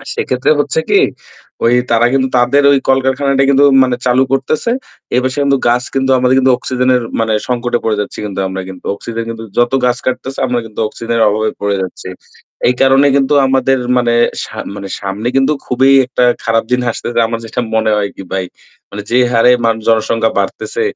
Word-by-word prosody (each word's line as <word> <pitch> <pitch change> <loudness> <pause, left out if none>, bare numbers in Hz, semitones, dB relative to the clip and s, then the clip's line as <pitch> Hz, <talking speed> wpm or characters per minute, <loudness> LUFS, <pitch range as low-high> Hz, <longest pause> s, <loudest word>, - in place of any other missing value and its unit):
আর - - -16
সেক্ষেত্রে 450 +1 -1
হচ্ছে 480 - 0
কি, 405 -1 +4 0.6
ওই 120 +1 +4 0.2
তারা 115 +1 +3
কিন্তু 130 -1 +1
তাদের 130 +4 +3
ওই 140 - +3
কলকারখানাটা 135 +1 +2
কিন্তু 140 +1 +4 0.2
মানে 125 -1 0
চালু 125 +1 +3
করতেছে। 135 - -1 0.5
এপাশে 130 +2 -1
কিন্তু 140 -1 +2
গাছ 125 +1 +1
কিন্তু 135 0 0
আমাদের 125 +1 +2
কিন্তু 130 -1 +3
অক্সিজেনের 125 0 0
এর - - -6 0.2
মানে 110 -1 0 0.2
সংকটে 120 -1 -1
পড়ে 110 -2 0
যাচ্ছি 105 - -6
কিন্তু 100 -1 -4
আমরা 95 0 -5
কিন্তু। 95 -1 -11
অক্সিজেন 115 +2 -6
কিন্তু 115 0 -7
যত 120 +1 +2
গাছ 125 0 +1
কাটতেছে 130 +1 -3
আমরা 125 -1 -1
কিন্তু 110 0 -8
অক্সিজেনের 115 +1 -3
অভাবে 110 +1 0
পড়ে 100 0 0
যাচ্ছি। 95 0 -7 0.6
এই 125 - +2
কারণে 135 +1 +4
কিন্তু 140 +1 +2
আমাদের 135 0 +1 0.2
মানে 120 -1 +1 0.3
সা - - -9 0.2
মানে 100 -1 -7
সামনে 100 +4 -3
কিন্তু 135 +3 +3
খুবই 130 +2 +2 0.2
একটা 125 0 0 0.2
খারাপ 115 0 +1
দিন 125 - +2
আসতেছে 120 +1 -2
আমার 115 0 -3
যেটা 115 +2 -3
মনে 110 0 +1
হয় 100 -1 -1
কি - - -8
ভাই, 95 -1 -1 0.5
মানে 105 0 -6
যে 120 - +3
হারে 115 +1 +4
মান 115 -1 +2
জনসংখ্যা 115 0 +1
বাড়তেছে, 455 - -3
125 Hz, 190 wpm, -14 LUFS, 115-135 Hz, 0.6 s, কি